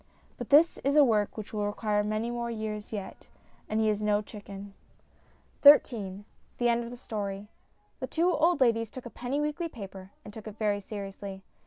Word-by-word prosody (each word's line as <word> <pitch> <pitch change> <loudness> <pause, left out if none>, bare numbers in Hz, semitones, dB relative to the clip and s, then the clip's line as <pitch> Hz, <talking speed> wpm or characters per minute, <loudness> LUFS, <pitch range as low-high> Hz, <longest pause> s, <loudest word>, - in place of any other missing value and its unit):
But - - -6
this 310 +4 +6
is 280 +1 0
a 300 - +8
work 215 -5 +1
which 215 0 -7
will 210 -1 0
require 210 0 0
many 215 +3 -1
more 235 0 -3
years 215 -2 -5
yet, 205 -3 -7 0.4
and 215 - 0
he 220 - +2
is 210 -1 +1
no 210 0 +2
chicken. 200 -1 -10 0.9
XIII 205 -9 +5 0.3
THE 240 -1 +2
END 235 0 +2
OF 235 - -7
THE 245 - -8
STORY 205 -4 -5 0.5
THE - - -3
two 340 +3 +2
old 325 0 +3
ladies 230 -3 +3
took 255 +2 -9
a 240 - -7
penny 250 +4 -3
weekly 300 +3 -2
paper, 195 -6 -9 0.2
and 210 - -10
took 220 0 -9
it 215 0 -8
very 205 -2 0
seriously. 195 -1 -7
215 Hz, 190 wpm, -29 LUFS, 205-240 Hz, 0.9 s, a